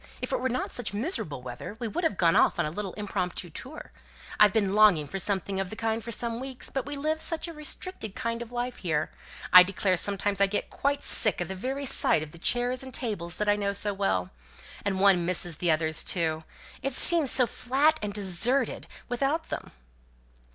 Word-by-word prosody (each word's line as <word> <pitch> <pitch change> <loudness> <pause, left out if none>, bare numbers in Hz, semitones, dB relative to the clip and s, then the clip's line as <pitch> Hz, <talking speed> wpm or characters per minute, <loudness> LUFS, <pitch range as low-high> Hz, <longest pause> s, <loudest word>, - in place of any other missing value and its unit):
If - - -5
it - - 0
were 260 +1 -1
not 255 +1 -2
such 225 -4 -5
miserable 205 - -2
weather 125 - -8
we 235 - -2
would 345 +11 -3
have 320 - 0
gone 170 -2 +3
off - - +4
on - - +1
a 150 - -3
little 195 +2 -5
impromptu 185 -4 -4
tour. 270 - -9 0.5
I've 210 -1 +7
been 200 -3 +1
longing 205 -8 +5
for 195 +7 -5
something 195 0 -1
of 195 -1 -2
the 220 - -6
kind 225 0 -2
for 235 - -6
some 230 +1 -2
weeks; 265 -1 -7
but 270 0 -3
we 290 - -3
live 310 +3 -1
such 330 0 0
a 335 - -7
restricted 300 - -3
kind 230 -2 -3
of 235 0 -8
life 245 +1 -3
here! 155 -4 -1 0.4
I 180 - +12
declare 185 0 +2
sometimes 200 +1 +1
I 200 - +6
get 205 +1 -3
quite 280 +1 -1
sick 215 - +3
of 175 - -3
the - - -3
very 265 +9 -4
sight 160 - +3
of 155 - -10
the 170 - -12
chairs 245 +6 +1
and 265 -1 -8
tables 200 -10 -3
that 210 - -1
I 205 - +4
know 200 -1 -1
so 205 +1 -1
well. 95 - -1 0.5
And 195 -2 -1
one 190 -3 +5
misses 175 -2 0
the 175 - 0
others 155 0 +2
too! 160 -3 0 0.4
It 275 0 -2
seems 325 +1 +4
so 255 0 +4
flat 280 +7 +1
and 210 -1 -3
deserted 210 +6 0 0.2
without 275 +6 -1
them!" - - -5
210 Hz, 215 wpm, -27 LUFS, 185-255 Hz, 0.5 s, I